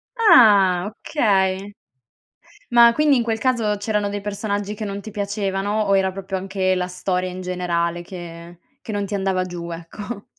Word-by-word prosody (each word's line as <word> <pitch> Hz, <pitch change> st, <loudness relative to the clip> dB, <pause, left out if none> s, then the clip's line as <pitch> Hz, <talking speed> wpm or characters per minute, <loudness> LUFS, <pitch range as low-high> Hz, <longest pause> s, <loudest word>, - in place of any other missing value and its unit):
Ah! 205 Hz, -, +6 dB
Okay. 200 Hz, -6 st, 0 dB, 1.0 s
Ma 235 Hz, -1 st, +6 dB
quindi 300 Hz, -2 st, +3 dB
in 235 Hz, -, +1 dB
quel 225 Hz, -1 st, -1 dB
caso 230 Hz, -5 st, +1 dB
c'erano 210 Hz, 0 st, -1 dB
dei 205 Hz, 0 st, -4 dB
personaggi 205 Hz, 0 st, -3 dB
che 210 Hz, 0 st, -6 dB
non 200 Hz, 0 st, -5 dB
ti 215 Hz, -, -9 dB
piacevano, 205 Hz, 0 st, -2 dB
o 200 Hz, -2 st, +2 dB
era 190 Hz, 0 st, +1 dB
proprio 195 Hz, 0 st, -4 dB
anche 190 Hz, 0 st, -1 dB
la 180 Hz, 0 st, -1 dB
storia 180 Hz, 0 st, -2 dB
in 185 Hz, +1 st, -7 dB
generale 175 Hz, -1 st, -2 dB
che 175 Hz, -1 st, -10 dB, 0.2 s
che 220 Hz, -, -6 dB
non 205 Hz, -1 st, -2 dB
ti 205 Hz, -, -7 dB
andava 190 Hz, -2 st, 0 dB
giù, 175 Hz, -1 st, -7 dB
ecco? 205 Hz, +7 st, -8 dB
195 Hz, 170 wpm, -21 LUFS, 185-210 Hz, 1.0 s, Ah